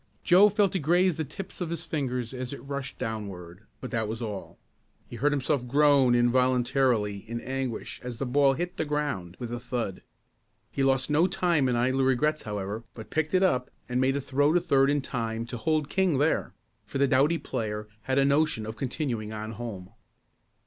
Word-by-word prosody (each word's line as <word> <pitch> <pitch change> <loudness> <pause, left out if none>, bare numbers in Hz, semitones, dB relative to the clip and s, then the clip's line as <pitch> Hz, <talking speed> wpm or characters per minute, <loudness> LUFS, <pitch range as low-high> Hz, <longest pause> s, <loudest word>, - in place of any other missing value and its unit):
Joe 190 +4 +7
felt 205 -2 +2
it - - +2
graze 175 +3 +3
the 160 - -1
tips 185 +7 -8
of 175 - -2
his 170 -1 -4
fingers 125 -5 -3
as 130 +1 -5
it - - -8
rushed 140 -1 -5
downward 100 -3 -6
but 130 - -7
that 115 -3 0
was 110 +1 -4
all. 105 -5 -6 0.5
He - - -9
heard 145 +5 +2
himself 140 -2 0
groan 140 -2 +4
involuntarily 120 -3 +2
in 120 0 -3
anguish 130 -2 -4
as 125 -2 -6
the 135 - -2
ball 135 +2 +4
hit 175 +5 -4
the - - 0
ground 145 -13 -2
with 120 -2 -5
a 120 - -3
thud. 120 -6 -4 0.7
He 140 - -2
lost 135 +1 +2
no 160 +5 +4
time 170 -8 +1
in 125 - +1
idle 130 +3 +2
regrets 150 +4 +2
however, 105 +1 -4
but 110 - -10
picked 160 +2 0
it 185 - +4
up 130 -9 +2 0.2
and 125 +1 0
made 135 +1 +2
a 140 - -1
throw 145 +2 +2
to 175 - +5
third 140 -5 +3
in 145 0 +2
time 115 -3 -3
to 120 +1 -6
hold 155 +4 0
King 185 -5 +1
there, 150 +4 +1 0.3
for 105 - -5
the 140 0 +3
doughty 145 +6 +3
player 105 -7 -4 0.2
had 130 0 0
a 135 - +4
notion 140 -5 +2
of 110 0 -6
continuing 120 -4 -3
on 110 0 -5
home. 105 -6 -7
130 Hz, 195 wpm, -27 LUFS, 115-150 Hz, 0.7 s, Joe